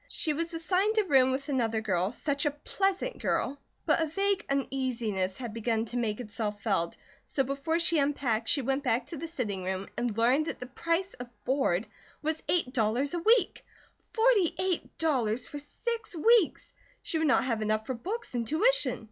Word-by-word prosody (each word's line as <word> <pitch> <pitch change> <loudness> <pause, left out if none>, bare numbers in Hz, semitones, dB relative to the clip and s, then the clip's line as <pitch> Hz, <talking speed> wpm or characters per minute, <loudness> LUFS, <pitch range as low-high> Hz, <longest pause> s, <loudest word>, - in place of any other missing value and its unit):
She 310 - -1
was 335 +3 -2
assigned 370 +6 +1
a 430 - +5
room 265 -7 +4
with 275 +2 -2
another 235 -6 0
girl, 190 -3 0
such 285 +4 -1
a 290 0 -2
pleasant 390 +5 0
girl; 280 +1 -1 0.3
but - - +3
a 320 - +1
vague 395 +5 0
uneasiness 245 -8 -1
had 240 -4 -5
begun 225 0 0
to 235 - -8
make 220 -2 -1
itself 210 -2 -4
felt, 190 -6 0 0.3
so 270 - 0
before 275 +5 -1
she 335 -1 +2
unpacked 265 -6 0
she 280 - +3
went 270 +2 0
back 245 -2 +1
to 330 - -7
the 330 - -5
sitting 220 - -3
room 190 +1 -3
and 240 -3 -2
learned 255 +7 +3
that - - -4
the 250 - -5
price 335 +8 -1
of 245 - -6 0.2
board 255 -8 +1 0.4
was 315 +1 -1
eight 325 -8 +1
dollars 245 +4 +1
a 345 - 0
week. 440 +2 +3 0.5
Forty 445 -7 +3
eight 370 -2 -2
dollars 250 -7 +1
for 290 - -7
six 455 +8 -5
weeks! 445 +2 +3 0.3
She 320 - -1
would 320 - +2
not 280 - +4
have 230 -4 -1
enough 215 0 0
for 260 - -2
books 390 - -5
and 235 -2 -2
tuition. - - +2
275 Hz, 190 wpm, -29 LUFS, 230-335 Hz, 0.5 s, a